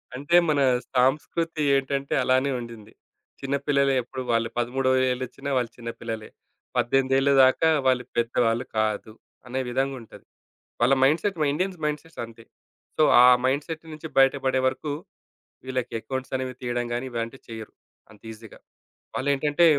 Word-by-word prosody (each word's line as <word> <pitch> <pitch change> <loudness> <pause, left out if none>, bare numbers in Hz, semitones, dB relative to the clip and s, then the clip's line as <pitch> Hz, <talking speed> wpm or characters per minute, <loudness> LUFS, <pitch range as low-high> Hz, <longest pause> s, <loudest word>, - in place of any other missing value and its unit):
అంటే, 145 +6 0
మన 150 -2 +2 0.4
సాంస్కృతి 150 +5 +1
ఏంటంటే 135 0 -1
అలానే 130 +2 +2
ఉండింది. 115 -3 -10 0.5
చిన్నపిల్లలే 140 0 +1
ఎప్పుడు 130 +2 -7
వాళ్ళు 115 -1 +1
పదమూడో 130 +2 0 0.2
ఏళ్ళోచ్చినా 130 +2 -5
వాళ్ళు 120 -2 0
చిన్న 115 -1 -6
పిల్లలే. 110 -2 -6 0.5
18 135 +2 +2
దాకా 130 +5 +4 0.2
వాళ్ళు 130 -1 +3
పెద్దవాళ్ళు 120 0 +1
కాదు 110 0 -1 0.3
అనే 130 +2 -3
విధంగా 135 +2 -1
ఉంటది. 115 - -15 0.6
వాళ్ళ 125 +3 +5
మైండ్‌సెట్. 170 +8 +2
మా 150 - +2
ఇండియన్స్ 185 +4 -2
మైండ్‌సెట్స్ 150 +2 -4
అంతే. 115 0 -13 0.5
సో, - - +3 0.2
ఆ - - +8 0.2
మైండ్‌సెట్ 150 +5 -2
నుంచి 155 +1 -8
బయటపడే 135 -1 +3
వరకు 145 +3 -4 0.7
వీళ్ళకి 130 -2 -3
అకౌంట్స్ 130 +3 -5
అనేవి 130 -1 -4
తీయడం 120 -1 -2
గాని 120 +2 -2
ఇలాంటివి 115 +2 -5
చెయ్యరు 110 -1 -8 0.4
అంత 105 - -18
ఈజీ‌గా. 110 0 -13 0.6
వాళ్లేంటంటే, 145 +4 +2
130 Hz, 135 wpm, -25 LUFS, 120-140 Hz, 0.7 s, ఆ